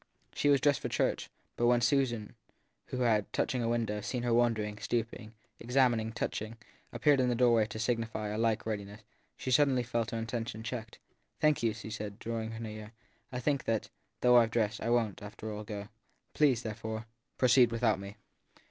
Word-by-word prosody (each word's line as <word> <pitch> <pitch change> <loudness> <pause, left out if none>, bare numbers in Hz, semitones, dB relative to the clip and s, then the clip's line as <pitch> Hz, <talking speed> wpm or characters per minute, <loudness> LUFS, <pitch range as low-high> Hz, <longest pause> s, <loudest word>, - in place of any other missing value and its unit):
She 145 - +1
was 140 -1 +5
dressed 140 0 +3
for - - -4
church; - - 0 0.3
but 120 - +2
when 120 0 +5
Susan, 120 -4 +1 0.5
who 125 - -3
had, 110 -4 +2
from 125 - 0
a 115 - 0
window, 115 -3 -1
seen 120 +3 -3
her 120 -1 +1
wandering, 110 -3 +1
stooping, 115 -1 -3 0.2
examining, 120 -3 +2
touching, 110 0 -4 0.3
appeared 145 -3 +3
in 125 -1 +3
the 120 - +1
doorway 115 -3 +4
to 110 - -7
signify 115 -2 -1
a 105 - -3
like 115 -1 +1
readiness, 105 -1 -4 0.4
she 130 - -3
sud 145 +3 +6
denly 130 -3 +1
felt 115 -1 -1
her 115 - -3
intention 115 -1 -4
checked. 115 -1 -5 0.4
Thank 150 -1 +3
you/ 115 -1 +2
she 110 0 -8
said, 105 -1 -5
drawing 115 -1 -4
near; 110 0 -7 0.4
I 125 - -3
think 140 +1 0
that, 110 -2 -1 0.3
though 125 0 +6
I 115 -1 +6
ve - - -10
dressed, 110 -1 0
I 115 - -1
won 115 -4 +2
t, - - -14
after 105 +1 -7
all, 105 +1 -5
go. 105 -1 -6 0.5
Please, 130 -6 +3
therefore, 110 0 -5 0.3
proceed 125 -1 +5
without 115 -3 +1
me. 100 +1 -8
115 Hz, 190 wpm, -31 LUFS, 110-120 Hz, 0.5 s, sud